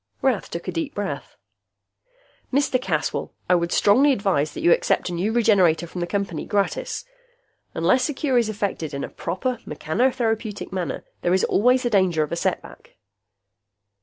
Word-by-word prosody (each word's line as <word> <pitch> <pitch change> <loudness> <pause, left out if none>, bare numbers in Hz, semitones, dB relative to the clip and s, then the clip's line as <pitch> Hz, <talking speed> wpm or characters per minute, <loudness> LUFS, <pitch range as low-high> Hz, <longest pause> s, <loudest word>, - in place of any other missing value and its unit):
Rath 255 -7 +1
took 170 - -6
a - - -1
deep 165 -2 -3
breath. 205 -1 -4 1.2
"Mr. 265 -2 +2
Caswell, - - -2
I - - +4
would 170 -1 +1
strongly 265 +8 +5
advise 195 - +1
that - - -5
you 175 - +5
accept - - +2
a - - -4
new 185 +6 0
Regenerator 195 -8 +3
from 175 +1 -6
the 175 - -1
Company, 195 -5 -2
gratis. 205 - -1 0.7
Unless 255 +2 +2
a 295 - -3
cure 265 -5 +2
is 230 -2 0
effected 195 -8 -3
in 140 - -3
a - - -4
proper 220 +8 -3
mechanotherapeutic 220 - -1
manner, 185 -2 -3 0.2
there 175 +1 +2
is 190 - +1
always 250 +5 +3
the 240 - 0
danger 185 -6 +3
of 150 - -6
a - - 0
setback." - - -4
200 Hz, 165 wpm, -23 LUFS, 175-245 Hz, 1.2 s, strongly